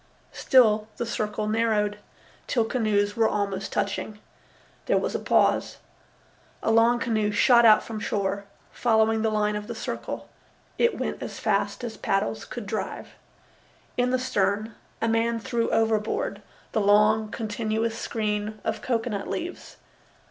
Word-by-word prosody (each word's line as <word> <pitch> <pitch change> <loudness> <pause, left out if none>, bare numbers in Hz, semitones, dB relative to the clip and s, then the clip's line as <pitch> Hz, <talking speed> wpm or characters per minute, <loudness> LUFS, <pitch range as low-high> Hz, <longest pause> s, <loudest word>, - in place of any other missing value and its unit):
Still 215 -5 +4
the 235 - -2
circle 215 -1 -2
narrowed, 215 -2 +1 0.5
till 230 -4 +1
canoes 210 -4 0
were 225 -1 +3
almost 200 -2 -2
touching. 205 +1 -2 0.7
There - - +3
was - - -1
a - - -1
pause. - - +2 0.9
A - - +2
long 230 +2 +5
canoe 220 -3 0
shot 235 +3 +5
out 215 - +6
from 220 -2 -6
shore, 200 -1 -2 0.3
following 220 -1 +2
the 220 - +2
line 210 -1 0
of 210 0 -5
the 235 - -5
circle. 225 - -5 0.5
It 470 - +3
went - - -3
as - - -6
fast - - 0
as 230 -2 -5
paddles 115 - -1
could 240 -4 -7
drive. 195 -1 -4 0.9
In 250 0 +1
the 255 - +2
stern 215 -3 0 0.3
a - - +2
man 230 +1 +1
threw 230 +1 -1
overboard 225 - 0 0.3
the 220 - +1
long, 210 +2 +4
continuous 220 +1 -2
screen 215 -1 -3
of 220 - -2
cocoanut 225 -4 -2
leaves. 350 +2 -5
220 Hz, 140 wpm, -26 LUFS, 210-230 Hz, 0.9 s, out